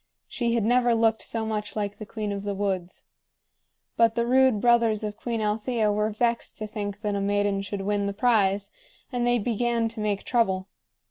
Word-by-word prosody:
She 235 -1 -1
had 230 - +1
never 245 0 +3
looked 225 -1 +2
so 225 -1 -3
much 210 -1 -3
like 205 -1 -3
the 215 - -7
queen 210 -1 -4
of 200 -1 -3
the 205 -1 -3
woods. 190 -3 -3 0.9
But 230 -1 +4
the 235 -1 +1
rude 260 -2 +4
brothers 230 -2 +3
of 210 -1 -3
Queen 230 0 -3
Althea 215 +1 0
were 210 +1 +1
vexed 235 +2 -1
to 215 - -4
think 205 -1 -5
that 210 -2 -1
a 200 - -1
maiden 205 0 +1
should 200 0 -4
win 200 0 0
the 200 - -2
prize, 205 -3 +2 0.4
and 245 -1 0
they 245 0 +3
began 235 +1 0
to 225 0 -8
make 210 -2 -1
trouble. 195 -6 0
215 Hz, 195 wpm, -26 LUFS, 205-235 Hz, 0.9 s, But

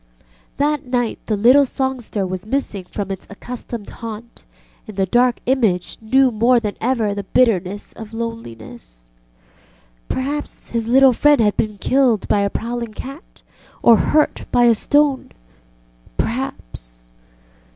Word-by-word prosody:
That 295 -1 0
night 245 -2 -1
the 215 - 0
little 250 +7 +6
songster 255 -6 -2
was 185 0 -4
missing 220 -7 -2
from 195 +1 -5
its 190 - -7
accustomed 235 0 -7
haunt, 230 +1 -9 0.4
and 215 -2 -10
the 195 - +2
Dark 245 +5 +2
Image 225 -9 0
knew 260 +4 +3
more 235 +3 +3
than 210 -3 -3
ever 230 -4 0
the 200 0 -4
bitterness 205 -4 +1
of 220 -1 -10
loneliness. 115 - -8 1.0
Perhaps 285 +3 -4
his 230 -1 -1
little 265 +2 +6
friend 290 +3 +4
had 210 -2 +3
been 210 -1 -1
killed 250 -1 +2
by 205 - +2
a 200 0 +1
prowling 235 0 -4
cat 275 - -10 0.4
or 235 - +8
hurt 305 +7 +1
by 245 - +4
a 235 -1 +6
stone. 290 +4 +1 0.8
Perhaps - - -5
230 Hz, 135 wpm, -19 LUFS, 200-260 Hz, 1.0 s, or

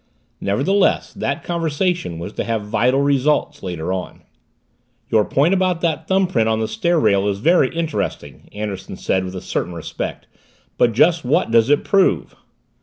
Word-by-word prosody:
Nevertheless, 145 - +1
that - - -3
conversation 170 - -1
was 85 +5 -7
to - - -3
have 115 -2 -2
vital 120 +6 +1
results 140 +1 +1
later 90 -1 -3
on. 95 -1 -6 0.9
"Your 110 -1 +4
point 145 - +2
about 185 -3 +1
that 160 -2 -1
thumbprint 185 -13 +2
on 110 0 +1
the 110 - -1
stair 175 - 0
rail 100 -6 +2
is 100 -1 0
very 150 - +3
interesting," 155 - -4
Anderson 105 -2 -6
said 95 - 0
with 95 0 -6
a 90 - -5
certain 90 - -3
respect. 85 - -6 0.5
"But 120 -2 +3
just 165 +7 +3
what 125 -2 +1
does 115 +1 +4
it 145 - +3
prove?" 195 -2 +1
125 Hz, 160 wpm, -20 LUFS, 100-170 Hz, 0.9 s, Your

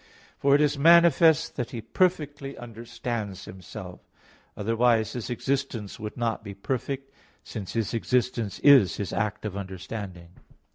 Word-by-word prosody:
For 140 0 +4
it 145 - +4
is 145 -1 +1
manifest 165 -1 +5
that 125 - -2
He 125 -3 -6
perfectly 145 - -1
understands 115 -3 -5
Himself; 95 -2 -9 0.6
otherwise 115 +1 +2
His 120 -3 -5
existence 125 -4 -3
would 105 0 -6
not 115 -2 -1
be 100 -2 -8
perfect, 135 +5 -4 0.3
since 100 -6 -7
His 115 -2 -1
existence 115 -3 0
is 135 -10 +7
His 100 - -4
act 105 0 -2
of 100 -3 -4
understanding. 95 -2 -7
115 Hz, 135 wpm, -26 LUFS, 105-135 Hz, 0.6 s, is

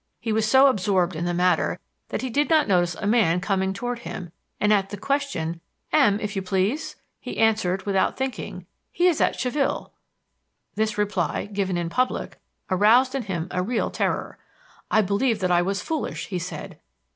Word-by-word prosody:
He 225 - -2
was 220 0 +1
so 265 +3 +7
absorbed 190 -7 +2
in 165 +2 -2
the 175 - 0
matter 180 -1 +2 0.3
that - - -3
he 260 - -3
did 290 +4 +1
not 315 -2 +4
notice 175 -3 +2
a 200 - -6
man 205 -6 +3
coming 190 0 0
toward 245 +5 -4
him, 180 -7 -7 0.3
and 210 0 +3
at 195 -2 +1
the 205 - -6
question, 195 - -2 0.3
'M......, 265 -10 +4
if 210 -1 -4
you 195 - -1
please 205 +12 -1
?' - - -50
he - - -7
answered, 215 -4 +1
without 195 -2 +1
thinking, 250 -8 -4 0.3
'He 350 - +1
is 350 -4 +3
at - - +2
Chaville.' 270 +2 -1 0.8
This 215 0 -1
reply, 205 -5 -1
given 200 -3 -2
in 170 -1 -2
public, 255 +7 -1 0.3
aroused 230 +7 +4
in 270 - -1
him 180 -6 -3
a 180 - 0
real 225 +5 -1
terror. - - -2 0.5
'I 220 - +4
believe 210 +4 +1
that 185 -2 0
I 175 0 +4
was 195 +2 -2
foolish,' 315 -3 -3
he 185 -3 -2
said. 175 +1 -7
205 Hz, 185 wpm, -24 LUFS, 185-245 Hz, 0.8 s, so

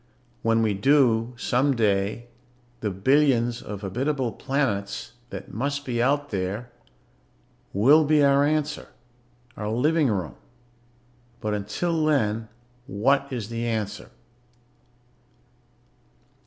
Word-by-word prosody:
When 115 0 +2
we 110 -2 +1
do, 120 +1 +3
someday, 115 -4 +1 0.5
the 110 - -2
billions 120 +3 +2
of 100 -2 -7
habitable 130 +5 -1
planets 115 -8 -2 0.2
that - - -8
must 140 +4 -2
be 120 -2 -1
out 145 +3 +1
there 100 +5 -3 1.0
will 140 +11 +5
be 150 0 +4
our 140 0 +4
answer... 150 0 -1 0.7
our 105 -1 -4
living 150 +7 +2
room. 95 -9 -2 1.0
But 110 -2 -2
until 155 - -1
then, 115 -7 +1 0.4
what 140 +4 +1
is 115 -5 -4
the 115 0 -3
answer? 110 -2 -3
120 Hz, 100 wpm, -25 LUFS, 105-140 Hz, 1.0 s, will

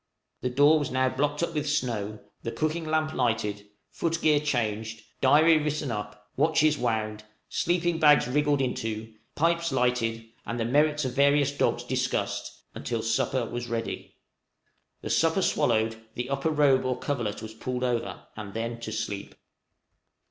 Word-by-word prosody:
The 125 - 0
door 145 +5 +5
was 145 - -2
now 130 0 +2
blocked 145 +4 -1
up 170 - -2
with 150 -1 -1
snow, 115 -8 -1 0.2
the 115 - -4
cooking 155 +4 -1
lamp 155 0 0
lighted, 110 -5 -1 0.2
foot 165 -1 -1
gear 150 -2 +4
changed, 110 -6 -2 0.2
diary 155 +4 +6
written 150 -3 -2
up, 105 -1 -6
watches 155 +1 +3
wound, 110 -4 -2 0.3
sleeping 175 -1 0
bags 150 -5 +6
wriggled 145 +1 +2
into, 110 -3 -3 0.2
pipes 170 +1 +1
lighted, 125 -3 0 0.2
and 120 +1 -4
the 115 - 0
merits 150 +3 +2
of 130 - -1
the - - -12
various 140 0 +4
dogs 140 - 0
discussed, - - -2 0.2
until - - -3
supper - - 0
was 120 0 -5
ready; 115 -1 -4 0.9
the - - -4
supper - - +2
swallowed, 110 0 +1 0.2
the 125 +2 -4
upper 140 +3 0
robe 145 -4 +4
or 130 -1 -1
coverlet 120 -7 -3
was 110 0 -7
pulled 125 +3 -4
over, 120 -2 -2
and 105 -2 -8
then 115 +1 -3
to 115 -2 -6
sleep. 105 -2 -4
130 Hz, 155 wpm, -27 LUFS, 115-150 Hz, 0.9 s, diary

